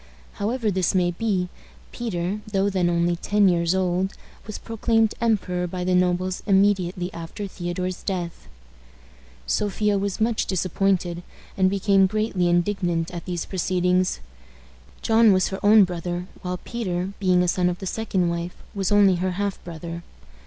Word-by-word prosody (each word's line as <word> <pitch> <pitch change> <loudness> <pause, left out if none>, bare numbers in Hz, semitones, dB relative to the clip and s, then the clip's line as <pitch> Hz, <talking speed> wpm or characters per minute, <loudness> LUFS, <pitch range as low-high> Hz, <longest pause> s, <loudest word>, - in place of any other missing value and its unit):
However 220 +1 -1
this 185 -1 0
may 175 -1 +3
be, 185 -1 -1 0.4
Peter, 205 -3 -3
though 200 0 +1
then 180 -2 +1
only 170 0 +1
ten 205 +3 +2
years 170 0 +2
old, 185 +1 0 0.3
was 215 - -5
proclaimed 225 -1 +1
emperor 185 -6 0
by 180 +1 -4
the 185 0 +1
nobles 180 0 +1
immediately 190 -2 +2
after 170 +5 -6
Theodore's 180 -1 -4
death. 180 -4 -4 1.0
Sophia 205 - 0
was 200 +1 -2
much 225 0 +1
disappointed, 185 -1 0 0.3
and 190 -1 +3
became 195 0 +3
greatly 195 -3 0
indignant 175 -1 0
at 175 -1 -7
these 175 -3 -3
proceedings. 180 0 0 0.8
John 225 -1 +5
was 185 -1 +2
her 195 - -4
own 210 0 +7
brother, 175 0 -3 0.2
while 180 0 -3
Peter, 190 -3 -3
being 180 -2 +3
a - - 0
son 180 0 +2
of 175 - -3
the 190 - -7
second 190 -3 -1
wife, 170 +1 -3 0.2
was 195 -2 -1
only 200 -3 +5
her 185 +1 -1
half 200 +1 -3
brother. 170 0 -7
185 Hz, 150 wpm, -24 LUFS, 175-200 Hz, 1.0 s, own